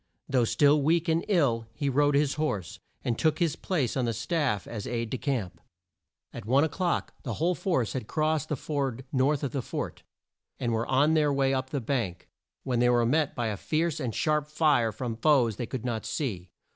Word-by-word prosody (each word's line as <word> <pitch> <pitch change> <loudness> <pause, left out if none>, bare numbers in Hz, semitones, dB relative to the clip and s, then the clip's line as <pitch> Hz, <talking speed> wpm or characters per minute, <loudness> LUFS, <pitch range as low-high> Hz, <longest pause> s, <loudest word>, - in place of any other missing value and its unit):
Though 125 -3 +2
still 145 +5 +4
weak 165 +3 +2
and 165 +1 +2
ill, 135 - +2
he 145 -1 -2
rode 145 +2 +3
his 145 -1 +2
horse, 105 - -3 0.2
and 120 -2 -1
took 155 -2 +2
his 165 -3 +1
place 150 - -1
on 130 -2 +1
the 115 - 0
staff 120 - -1
as 105 -4 -6
aide 115 -2 -3
de 130 - -1
camp. 100 - -2 0.7
At 120 - -7
one 130 +7 +3
o'clock 175 +2 -1
the - - -4
whole 170 +3 +1
force 165 - -1
had 125 -5 -4
crossed 155 -1 0
the 150 - 0
ford 135 -3 -3
north 140 +3 +2
of 140 - -1
the 135 - -2
fort, - - -5 0.6
and 120 -2 -1
were 115 +1 -1
on 145 +4 +3
their 150 -2 +3
way 135 -1 +2
up 130 0 -1
the 140 - -2
bank, 115 -8 -2 0.4
when 125 -2 0
they 120 0 +4
were 120 -1 +3
met 150 +5 +1
by 120 -3 -1
a 105 - -3
fierce 160 - -1
and 125 -6 -3
sharp 150 -1 +1
fire 150 -7 +2
from 115 +1 -4
foes 120 -5 +3
they 120 - -3
could 125 -1 -5
not 115 -3 -2
see. 110 - -3
135 Hz, 210 wpm, -28 LUFS, 115-150 Hz, 0.7 s, still